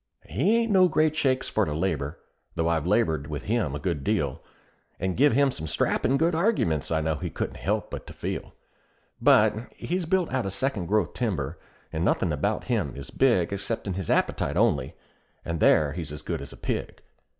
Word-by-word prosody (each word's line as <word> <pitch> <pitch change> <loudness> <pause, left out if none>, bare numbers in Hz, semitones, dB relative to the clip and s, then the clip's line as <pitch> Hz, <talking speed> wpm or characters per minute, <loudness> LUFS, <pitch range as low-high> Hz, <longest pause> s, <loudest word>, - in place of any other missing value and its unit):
"He 150 - +2
ain't 230 -1 +1
no 185 -2 +6
great 155 -2 +2
shakes 130 -4 +1
for 110 - +1
to 75 -6 -2
labor, 80 -4 -1 0.4
though 80 0 0
I've 85 -1 0
labored 80 -9 +1
with 75 -2 -5
him 105 - 0
a - - -3
good 75 -2 -2
deal, - - 0 0.6
And 95 0 -1
give 145 +1 +4
him 140 +2 +4
some 80 -8 -5
strappin' 125 - +1
good 165 +4 +2
arguments 160 - +1
I 80 -1 +1
know 80 -1 0
he - - -4
couldn't - - -4
help - - -2
but - - -6
to - - -9
feel; - - -5 0.7
But 110 +4 +4
he's 180 -1 -3
built 180 -3 +1
out 130 -6 0
of 95 - -4
second 100 -5 -1
growth 105 +3 +1
timber, 85 - -2 0.3
and 80 - -1
nothin' 85 -2 +1
about 75 - -1
him - - -1
is 70 -1 -7
big 115 -11 +2
Exceptin' 100 0 -3
his 95 -1 -4
appetite - - +1
only, 65 - +2 0.5
and 85 -1 -2
there 75 -2 +4
he's 80 -3 -5
as 75 - -8
good - - -3
as - - -8
a - - -12
pig. - - -4
95 Hz, 195 wpm, -26 LUFS, -, 0.7 s, no